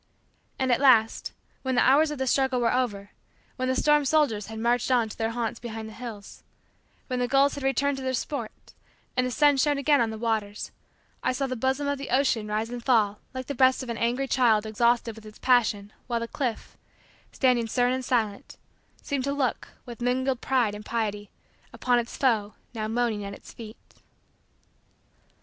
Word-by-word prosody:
And 260 -1 0
at 245 - +2
last, 230 -5 +4 0.3
when 260 -1 -1
the 245 - +4
hours 295 +4 +5
of 300 - -4
the 265 - -1
struggle 265 0 +1
were 235 -2 +2
over; 205 -6 -2 0.4
when 255 -1 -2
the 260 - +1
storm 295 +2 +3
soldiers 275 -8 +1
had 220 0 -7
marched 235 +2 +1
on 240 -4 +2
to - - -8
their 225 0 -1
haunts 230 0 -3
behind 225 -2 -6
the 220 - -10
hills; 225 -4 -9 0.6
when 255 -1 -3
the 245 - +1
gulls 275 +2 +3
had 285 - -6
returned 270 +1 +1
to 265 - -6
their 260 0 0
sports; 240 -3 -6 0.4
and 255 0 +1
the - - -2
sun 290 +2 +3
shone 290 +1 +2
again 285 -1 +3
on 230 - +1
the 220 - -5
waters; 215 -2 -2 0.5
I - - 0
saw 275 +2 -1
the 255 -1 -3
bosom 265 +4 -1
of 285 -1 -1
the 275 - -6
ocean 255 -5 +1
rise 215 +2 -2
and 245 -1 -6
fall 215 -5 +2 0.2
like 260 0 -4
the 285 - -4
breast 260 0 +3
of 250 - -8
an 230 - -3
angry 245 +4 0
child 230 -5 +3
exhausted 235 +1 +1
with 220 - -13
its 215 - -13
passion 215 -5 +2
while 235 -1 -1
the 230 - -3
cliff, 245 -3 -4 0.5
standing 250 -3 +2
stern 245 +2 +1
and 260 0 -2
silent, 225 -5 -2 0.5
seemed 275 -2 -2
to 280 - -1
look, 270 -4 -1 0.2
with 240 -2 -10
mingled 255 +1 0
pride 245 -6 +1
and 210 0 -8
pity, 210 -3 -3 0.4
upon 245 -1 +1
its 235 0 -5
foe 220 -6 +1 0.2
now 215 -2 -3
moaning 225 -2 -1
at 200 0 -6
its - - -14
feet. 220 -1 -10
245 Hz, 200 wpm, -26 LUFS, 220-265 Hz, 0.6 s, hours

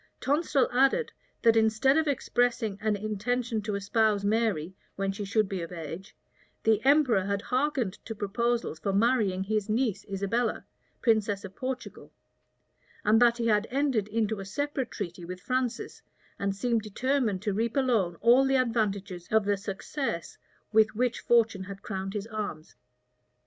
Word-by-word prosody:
Tonstal 285 -2 +2
added, 270 - +3 0.3
that 230 -2 +6
instead 225 +5 +3
of 320 0 +2
expressing 245 -6 0
an 215 -1 +1
intention 220 +3 -2
to 210 0 -3
espouse 205 0 +1
Mary 205 -6 0 0.2
when 195 0 -1
she 200 +1 -5
should 205 +1 +1
be 190 -2 -3
of 165 - -6
age, 165 +2 -8 0.5
the 220 -1 +3
emperor 270 -7 +4
had 200 +1 -2
hearkened 255 -6 -1
to 225 - -5
proposals 230 -2 -1
for 195 - -1
marrying 205 -3 +2
his 215 +1 -1
niece 225 -2 0
Isabella, 200 +4 -1 0.4
princess 210 -4 +2
of 190 0 -10
Portugal; 260 0 -6 0.9
and 225 +2 +5
that 240 -1 +5
he 235 - -2
had 215 -1 +2
entered 260 -6 +1
into 220 -1 -1
a 195 - -6
separate 275 +3 -2
treaty 175 -3 -6
with 180 +1 -7
Francis, 255 +3 -2 0.4
and 200 0 -1
seemed 230 +2 0
determined 220 -2 -1
to 205 -2 0
reap 230 +4 -1
alone 225 -10 +2
all 245 +3 +6
the 270 0 +2
advantages 205 -7 -1
of 220 -1 +3
the 205 0 +2
success 195 - -4 0.4
with 220 0 +4
which 245 +1 0
fortune 225 -5 +2
had 200 +1 -9
crowned 195 -2 -4
his 205 -1 -3
arms. 210 -8 -6
220 Hz, 155 wpm, -28 LUFS, 200-245 Hz, 0.9 s, that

